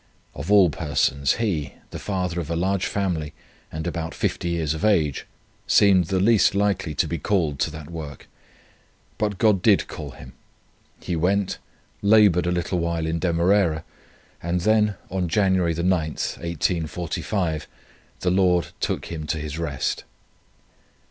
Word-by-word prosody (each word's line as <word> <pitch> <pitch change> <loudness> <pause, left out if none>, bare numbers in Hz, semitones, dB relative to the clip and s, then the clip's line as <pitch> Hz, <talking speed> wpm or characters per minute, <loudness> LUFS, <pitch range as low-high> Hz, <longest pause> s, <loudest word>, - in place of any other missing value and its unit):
Of 75 +9 -5
all 95 -5 +6
persons 70 -2 +1
he, 90 -11 -2 0.2
the - - -6
father 90 -3 -2
of 80 -3 -5
a 85 - -1
large 95 +2 0
family, 85 -7 -2 0.4
and 80 0 -5
about 85 -2 -4
50 85 - -1
years 80 -3 0
of 80 - -6
age, 80 -10 +2 0.4
seemed 95 -4 +5
the 95 +3 0
least 105 0 +4
likely 100 -6 0
to - - +1
be 85 - -3
called 80 -5 0
to - - +1
that 75 +1 -9
work; 75 -4 -8 0.9
but 105 -3 -1
God 105 -3 +3
did 100 0 +4
call 75 -4 -7
him. 65 -1 -12 0.7
He 90 - -3
went, 95 +4 0 0.4
laboured 100 -5 +5
a - - +1
little 90 +1 -1
while 85 -1 -1
in 80 +1 -1
Demerara, 85 -1 +2 0.6
and 85 +1 -1
then, 105 +1 +3 0.2
on 95 -2 -1
January 95 -3 +2
9, 85 +2 -1
1845, 85 +1 -2 0.5
the 90 - +1
Lord 90 -4 +2
took - - -2
him 80 -2 -5
to 80 - -1
his 75 +1 -5
rest. 70 -5 -2
85 Hz, 150 wpm, -24 LUFS, 80-95 Hz, 0.9 s, all